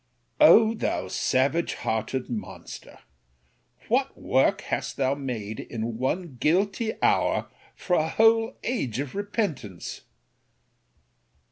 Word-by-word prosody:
O 225 -7 +7
thou 95 - -2
savage 135 - +1
hearted 110 +4 -2
monster! 105 -6 -8 0.9
What - - 0
work - - +2
hast - - -3
thou 135 0 +2
made 120 -7 -5
in 115 0 -5
one 140 +2 -2
guilty 195 - +1
hour, - - +2 0.2
for 180 - -3
a 155 +1 +1
whole 225 +2 +3
age 135 - -2
of 140 -1 -4
repentance! 195 - -3
140 Hz, 105 wpm, -26 LUFS, -, 0.9 s, O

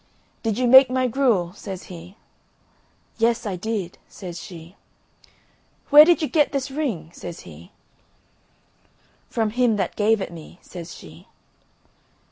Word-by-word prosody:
"Did 225 -2 -2
you 250 - +1
make 260 +1 +8
my 255 0 0
gruel?" 225 -9 +1
says 195 -2 -8
he. 180 +3 -12 1.0
"Yes, 230 +1 +1
I 200 -3 -3
did," 195 -1 -4
says 175 -3 -9
she. 170 0 -11 1.2
"Where 295 +1 +10
did 340 -1 +3
you - - +1
get 300 -2 +2
this 275 0 -2
ring?" 230 - -3
says 170 - -9
he. 85 0 -14 1.6
"From 220 -2 -1
him 240 -1 +2
that 190 -3 -2
gave 220 +1 +2
it 190 - -5
me," 165 +1 -12
says 175 -1 -9
she. 80 +1 -14
210 Hz, 135 wpm, -23 LUFS, 175-255 Hz, 1.6 s, Where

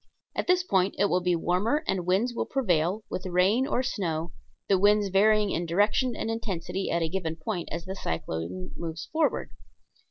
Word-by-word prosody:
At - - -2
this 360 0 +4
point 190 - +1
it 200 0 +2
will 180 - +2
be 180 0 +2
warmer 200 - +1
and 185 -2 -1
winds 205 +7 +2
will - - -2
prevail, 190 - +1
with 185 - -4
rain 190 +9 +3
or 255 - 0
snow, 170 -8 -2 0.4
the 195 -2 +3
winds 205 0 +4
varying 210 +1 +4
in 170 +1 -1
direction 210 +8 +2
and 225 - -2
intensity 195 -4 -3
at 170 0 +1
a - - +1
given 165 -2 -3
point 175 +2 -4
as 170 - -4
the 190 - -4
cyclone 85 - -4
moves 165 -1 -5
forward. 315 0 +1
190 Hz, 185 wpm, -27 LUFS, 170-215 Hz, 0.4 s, this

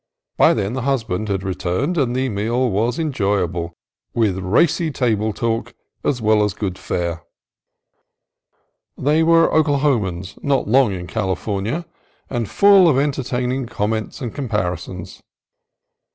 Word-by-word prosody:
By - - +5
then 100 +3 -2
the 130 - -2
husband 115 -6 -1
had 95 -1 -1
re 95 -1 -2
turned, 100 - -1
and 130 -6 0
the 130 +1 0
meal 115 +3 0
was 115 +5 0
enjoyable 95 - -1 0.4
with 105 -5 +1
racy 145 - +2
table 110 -6 0
talk 115 +2 -2 0.3
as 130 - 0
well 110 -1 +3
as 105 -2 0
with - - -24
good 95 -3 -3
fare. 85 -1 -3 1.8
They 150 +4 +2
were 165 0 +5
Oklaho 145 -5 +2
mans, 95 +1 -6
not 140 -2 0
long 125 0 +4
in 90 -2 -5
California, 100 - -2 0.5
and 115 -4 -2
full 200 -3 +6
of 140 - +3
entertaining 130 -2 -1
comments 110 +3 -3
and 120 -4 -4
comparisons. 90 - -4
115 Hz, 140 wpm, -20 LUFS, 95-135 Hz, 1.8 s, full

